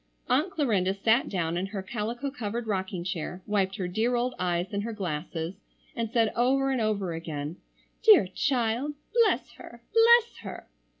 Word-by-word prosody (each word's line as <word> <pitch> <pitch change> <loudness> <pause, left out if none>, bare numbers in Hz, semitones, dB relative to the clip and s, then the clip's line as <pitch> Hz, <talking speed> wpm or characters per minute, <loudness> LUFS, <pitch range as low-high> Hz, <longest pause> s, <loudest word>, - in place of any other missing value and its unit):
Aunt 295 +9 +2
Clarinda 215 - +1
sat 225 +5 +2
down 170 -3 -1
in 185 +2 -1
her 195 -1 -5
calico 235 +7 -3
covered 235 -3 -4
rocking 190 -4 -2
chair, 180 0 -4
wiped 195 -2 0
her 185 - -3
dear 225 +7 0
old 245 +1 0
eyes 180 +2 -1
and 200 - 0
her 230 +2 -4
glasses, 165 -3 -4 0.4
and 230 -2 -2
said, 225 -2 +2
over 270 +3 +2
and 260 -3 0
over 200 -5 0
again: 160 -1 -5 0.4
"Dear 430 - +7
child! 250 +6 0 0.2
Bless 465 -2 +3
her! 235 0 -12
Bless 465 +1 +5
her!" - - -8
215 Hz, 165 wpm, -28 LUFS, 185-250 Hz, 0.4 s, Dear